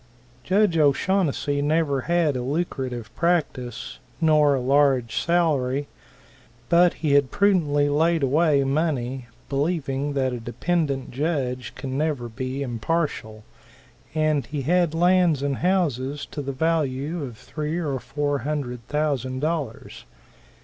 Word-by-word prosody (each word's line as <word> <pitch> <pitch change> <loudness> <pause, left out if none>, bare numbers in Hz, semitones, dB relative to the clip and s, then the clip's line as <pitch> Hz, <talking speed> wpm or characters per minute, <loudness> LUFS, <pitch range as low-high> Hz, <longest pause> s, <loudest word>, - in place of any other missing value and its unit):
Judge 190 -3 +2
O'Shaunnessy 145 -1 +1
never 145 -2 +1
had 170 -5 +2
a 125 - -2
lucrative 130 -5 -3
practice 150 -8 -1 0.2
nor 150 -3 +4
a - - 0
large 130 -3 +2
salary 145 -5 +1 0.8
but 175 +1 +5
he 150 - +2
had 140 -2 +4
prudently 165 -8 +2
laid 160 +2 +2
away 145 +1 +3
money 135 -4 -1 0.2
believing 145 -1 -1
that 130 -2 0
a 120 - -4
dependant 140 +3 -2
judge 130 -4 -2
can 135 0 -4
never 150 -6 -1
be 130 +4 -4
impartial 120 -3 -2 0.7
and 155 -5 +1
he 145 +1 -4
had 170 +1 +2
lands 175 -4 +3
and 140 -2 -1
houses 145 -7 0
to 145 - -6
the 140 0 -3
value 155 +1 -1
of 120 -5 -7
three 155 +6 -4
or 145 -6 -2
four 145 +2 -2
hundred 130 -3 -3
thousand 140 -4 -1
dollars. 150 -6 -4
145 Hz, 125 wpm, -24 LUFS, 130-165 Hz, 0.8 s, but